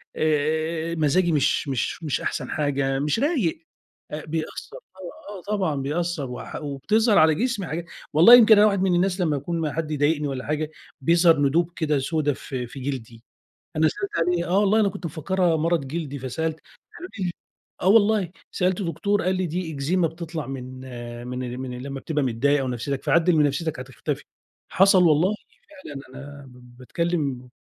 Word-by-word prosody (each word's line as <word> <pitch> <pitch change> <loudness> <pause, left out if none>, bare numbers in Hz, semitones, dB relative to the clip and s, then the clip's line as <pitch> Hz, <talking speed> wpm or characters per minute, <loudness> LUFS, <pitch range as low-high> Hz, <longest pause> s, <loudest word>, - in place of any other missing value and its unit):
آآ، 160 +2 0
مزاجي 170 +3 +2
مش 145 -1 +1
مش 135 +5 -2
مش 150 - -1
أحسن - - -3
حاجة، 135 -2 0
مش 150 +9 0
رايق، 235 - 0 0.5
آآ، 150 +1 -5
بيأثر 155 0 -5
طب 185 0 -14 0.3
آه 185 - -9
طبعًا 180 -7 0
بيأثر، 150 0 -2
وح - - -7
وبتظهر 205 - +1
على 155 -1 +5
جسمي 225 -4 -1
حاجا 165 +2 -4 0.3
والله 175 +11 +9
يمكن 220 -3 +7
أنا 210 +1 +7
واحد 200 -2 +1
من 185 -2 +2
الناس 185 +1 +1
لمّا 155 -4 +1
باكون 165 +4 -3
ما 150 -3 -2
حد 160 -1 -3
يضايقني 145 0 +1
والّا 135 -2 -4
حاجة 150 +1 -2 0.3
بيظهر 165 +1 +4
ندوب 160 +5 +2
كده 150 -3 0
سودة 150 +1 0
في 125 -2 -6
في 135 - -10
جلدي، 120 -4 -6 0.5
أنا 155 0 +4
سألت 200 +4 -3 0.2
عليها، 175 -1 0
آه 190 +3 +3
والله 210 +2 +3
أنا 205 - +3
كنت 185 - -8
مفكرها 170 +2 0
مرض 160 -3 0
جلدي، 145 -2 -4
فسألت 155 +5 -3 0.4
قالوا 360 +2 -8
لي 180 -2 -1 0.5
آه، 185 - 0
والله 205 -3 +4 0.2
سألت 185 +2 0
دكتور 200 +3 0
قال 185 +1 +1
لي: 185 0 -1
"دي 165 0 -4
إكزيما 165 +5 +1
بتطلع 165 -2 -6
من 130 -1 -7 0.5
من 125 0 -5
من 125 -1 -6
لمّا 135 0 -5
بتبقى 150 0 -1
متضايق 135 +4 +1
أو 130 - -2
نفسيتك 130 +2 -3
فعدّل 170 0 +3
من 150 -1 +4
نفسيتك 145 0 -2
هتختفي"، 130 0 -5 0.5
حصل 195 0 +5
والله 170 +6 +3 0.3
فعلًا 280 - -10
أنا 140 +1 -10
باتكلم 125 +2 -3
160 Hz, 170 wpm, -24 LUFS, 140-180 Hz, 0.5 s, والله